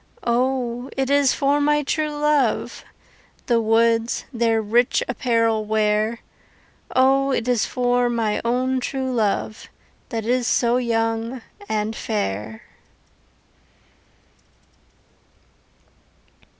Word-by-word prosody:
O, 245 +1 -1
it 270 0 0
is 285 -2 +3
for 285 +1 +1
my 295 0 +2
true 305 +2 -1
love 295 -5 0 0.6
The 235 -2 +2
woods 225 +1 +1
their 230 -1 +1
rich 230 +3 +2
apparel 230 -3 +1
wear 215 +1 0 0.7
O, 270 +1 +3
it 250 -3 -1
is 245 -3 +1
for 245 0 +1
my 225 -3 -1
own 255 +2 0
true 260 0 -3
love, 215 -1 -2 0.4
That 225 -3 -4
is 245 0 +1
so 240 0 +2
young 225 0 -1 0.3
and 215 0 -1
fair. 110 - -4
235 Hz, 100 wpm, -22 LUFS, 225-260 Hz, 0.7 s, is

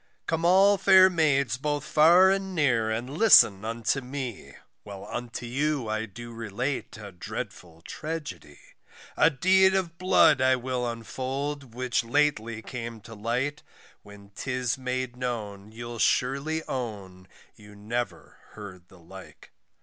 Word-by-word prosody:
Come 165 0 -2
all 195 +3 +5
fair 190 -1 +6
maids 140 -7 +1
both 145 0 -2
far 175 +5 +5
and 195 -1 -2
near 120 -8 +1
and 115 +3 -3
listen 135 - +5
unto 115 +4 -2
me, 125 - -7 0.3
While 100 -1 -10
unto 120 +2 -6
you 140 +1 -1
I 110 +1 -2
do 120 +4 -10
relate 115 +5 -4
a 105 -2 -10
dreadful 85 -1 -8
Tragedy, 150 - -7 0.6
A 160 - +5
deed 190 +5 +3
of 170 -3 -2
blood 165 -6 +4
I 130 0 +4
will 125 -1 -3
unfold 130 +3 -5
which 125 -1 -1
lately 115 -4 0
came 115 -3 -7
to 115 +2 -12
light, 125 +7 -2 0.4
When 100 0 -15
'tis 125 +3 -2
made 130 -1 -4
known, 110 -5 -5
you'll 120 +1 -8
surely 140 +9 0
own 100 -7 -6 0.3
you 105 -1 -16
never 115 +4 -5
heard 95 -4 -11
the 95 - -18
like. 95 +2 -14
125 Hz, 135 wpm, -26 LUFS, 110-150 Hz, 0.6 s, fair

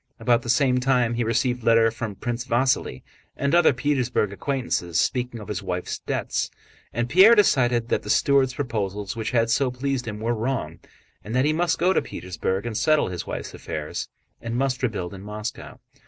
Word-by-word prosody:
About 120 -1 +2
the 120 - -8
same 125 +1 +3
time 125 -2 +2
he 120 0 0
received 125 +2 0
letters 115 -1 +4
from 110 -3 -5
Prince 120 +4 -4
Vasíli 125 - 0 0.3
and 140 +2 0
other 175 -1 +6
Petersburg 125 -6 0
acquaintances 100 - -1
speaking 125 +2 -1
of 105 - -9
his 100 -2 -3
wife's 90 -2 -4
debts. - - -2 0.4
And 120 +1 -1
Pierre 195 - +7
decided 120 - +3
that - - +1
the - - -9
steward's 135 -2 +3
proposals 105 -6 -3
which 110 -1 -3
had 115 -1 +1
so 135 +2 +2
pleased 125 0 -3
him 105 -1 -5
were 115 +2 0
wrong 110 -9 -3 0.4
and 110 +5 -5
that 130 +2 +3
he 155 - +2
must 170 +1 +1
go 180 +2 +3
to - - +2
Petersburg 95 +3 -4
and 115 -2 -4
settle 155 +4 +2
his 90 -2 -5
wife's - - -5
affairs 75 -1 -5 0.3
and 115 0 -4
must 130 -1 0
rebuild 105 -8 -2
in 95 - -9
Moscow. 105 +3 -7
120 Hz, 185 wpm, -24 LUFS, 105-130 Hz, 0.4 s, Pierre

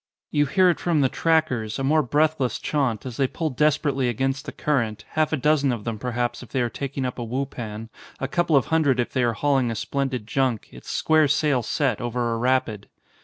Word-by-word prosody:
You 145 0 +2
hear 185 +6 +4
it 170 - -4
from 165 -4 +1
the 135 - +3
trackers, 130 -11 0
a 135 - -3
more 155 +3 +3
breathless 145 -2 +1
chaunt, 135 -8 -1
as 125 -3 -6
they 135 - +2
pull 160 +3 -3
desperately 140 -2 +1
against 135 +3 -1
the - - -3
current, 115 -8 -1
half 155 -1 0
a 155 - +1
dozen 145 0 +2
of 115 -4 -4
them 115 -2 -4
perhaps 120 0 -2
if 125 - -11
they 130 - -1
are 120 - -2
taking 140 -1 -4
up 125 0 -4
a - - -2
wupan, 115 -3 -4 0.3
a 135 - -2
couple 170 +2 +1
of 135 -4 +4
hundred 145 -6 +3
if 120 - -1
they 130 - +1
are 120 -1 +2
hauling 135 0 +1
a 115 - -3
splendid 130 -3 -2
junk, 125 -1 -1
its - - -12
square 155 -1 +3
sail 145 -2 +2
set, 125 0 -1
over 120 -1 -1
a - - -1
rapid. 120 -5 0
130 Hz, 220 wpm, -24 LUFS, 120-145 Hz, 0.3 s, hear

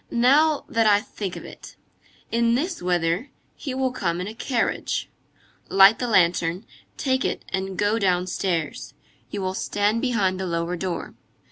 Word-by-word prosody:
Now 285 +6 +3
that 225 -1 +2
I 205 -1 +5
think 200 -3 -6
of - - -8
it. - - -12 0.6
In 235 0 +2
this 340 +7 -2
weather, 175 - 0 0.3
he 270 -4 -5
will 260 -1 0
come 175 -8 -2
in 180 - -3
a 210 - -6
carriage. 235 +1 -2 0.6
Light 195 +3 +7
the 245 - -1
lantern, 175 -2 +2 0.3
take 260 -2 0
it - - -2
and 190 0 -3
go 205 +3 +1
downstairs. 180 -3 -1 0.3
You 200 -2 -4
will 185 0 -1
stand 205 +3 0
behind 200 -7 +1
the 190 - -2
lower 170 +1 -1
door. 175 -1 -4
200 Hz, 155 wpm, -24 LUFS, 180-235 Hz, 0.6 s, Light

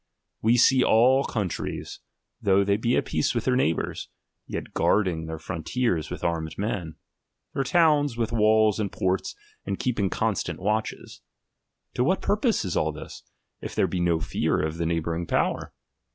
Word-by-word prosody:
We 115 +3 +4
see 130 +2 +5
all 130 +5 +4
countries, 100 -6 -4 0.4
lOUgh 100 0 +4
they 100 0 +2
be 115 +4 +1
at - - 0
peace - - 0
with 120 - -1
their 130 - +2
neighbours, 85 - -1 0.6
guarding 85 -6 +1
their 80 0 -5
frontiers 85 - -2
with - - -7
armed 80 -2 -2
men, 95 -6 -3 0.6
their 135 - 0
towns 150 -4 +3
with 115 -2 -1
walls 110 -1 +3
and 100 -3 -1
ports, 95 0 -1 0.3
and - - -3
keeping 115 -7 0
constant - - -1
watches. 105 +3 -3 0.7
To 125 - +1
what 185 +8 +2
purpose 215 - +1
is 90 - -2
all 80 - +1
this, 75 - -10 0.4
if - - -6
there - - +3
be 90 - -2
no 85 -2 +2
fear - - 0
of 80 +1 -2
the 85 - 0
neighbouring 85 0 -2
power - - 0
105 Hz, 160 wpm, -26 LUFS, 85-125 Hz, 0.7 s, see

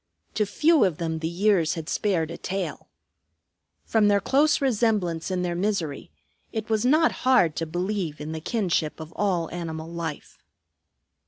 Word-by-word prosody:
To 210 -1 0
few 305 +6 +4
of 180 -6 +1
them 160 -1 -2
the 160 - -2
years 175 -1 +2
had 160 -2 -6
spared 170 -6 0
a 170 - -6
tail. 185 -4 -4 1.0
From 220 -2 +3
their 205 -1 +4
close 290 +7 +3
resemblance 210 - 0
in 185 -1 -1
their 175 -1 -1
misery, 175 -6 -2 0.4
it 220 0 -4
was 215 -1 +2
not 310 +6 +4
hard 245 -12 +4
to 165 - -2
believe 175 -2 -2
in 150 +1 -5
the 160 0 -5
kinship 175 -7 -1
of 160 0 -9
all 185 -5 0
animal 160 -2 -5
life. 165 -3 -6
180 Hz, 160 wpm, -25 LUFS, 165-215 Hz, 1.0 s, few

